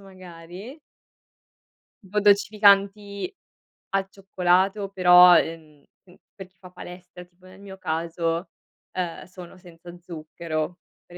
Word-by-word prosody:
magari 185 - -12 1.3
tipo 205 +2 -2
dolcificanti 200 - +2 0.6
al 195 0 0
cioccolato, 195 +1 0
però, 180 -2 +7
ehm, 155 -3 -5 0.2
mhmm, 180 - -19 0.2
per 190 -2 -10
chi 185 +1 -39
fa 180 0 -14
palestra, 180 0 -12
tipo 180 +1 -26
nel 185 +1 -16
mio 195 -1 -12
caso, 165 +1 -3 0.4
uhm, 180 -2 -4
sono 180 -1 -13
senza 175 -1 -14
zucchero, 165 -1 -6 0.3
per 175 - -14
180 Hz, 115 wpm, -24 LUFS, 170-195 Hz, 1.3 s, però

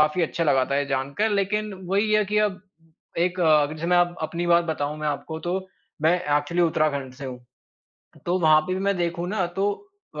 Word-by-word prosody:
काफ़ी 150 +4 +3
अच्छा 165 +1 -1
लगा 135 -4 +3
था - - +2
ये 145 - -1
जानकर 140 +10 -1
लेकिन 210 +1 0
वो 185 +2 -3
ही 215 +1 +2
है 215 0 +4
कि 210 +2 +1
अब 205 -3 0 0.6
एक 180 +2 0
अ, 155 -3 +5
जैसे 155 +2 -5
मैं 180 0 +3 0.3
अपनी 170 +2 -3
बात 170 0 +4
बताऊँ 150 -2 -2
मैं 155 - -3
आपको, 160 +2 -4
तो 185 +3 -3 0.4
मैं 160 +2 +5 0.2
एक्चुअली 170 +4 0
उत्तराखंड 150 -5 0
से 135 - -9
हूँ, 125 -1 -6 0.9
तो 175 +2 +1
वहाँ 155 -2 +6
पे 185 +3 -3
भी 190 - -3
मैं 200 0 +1
देखूँ 170 0 -2
ना, 200 -2 0
तो 195 +4 -1 0.4
अ, - - -4
170 Hz, 210 wpm, -24 LUFS, 150-190 Hz, 0.9 s, वहाँ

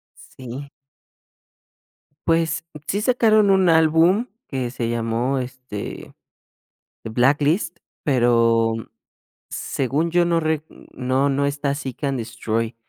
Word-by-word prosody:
Sí. 130 +2 -9 1.6
Pues, 165 -1 +1 0.2
sí 200 - -1
sacaron 215 -3 +4
un 190 -2 +4
álbum 165 +7 +4 0.2
que 130 -3 -3
se 120 -2 -3
llamó, 120 +3 0
este, 125 -5 -7 0.9
Blacklist, 145 - +1 0.3
pero 115 -4 +3 0.8
según 145 +6 -1
yo 175 0 +3
no 170 -1 +2
rec 155 -1 0 0.3
no 130 +2 +1
no 140 +1 +1
está 140 0 -1
Seek& 135 -3 -7
Destroy. 115 -1 -3
140 Hz, 100 wpm, -22 LUFS, 120-165 Hz, 1.6 s, sacaron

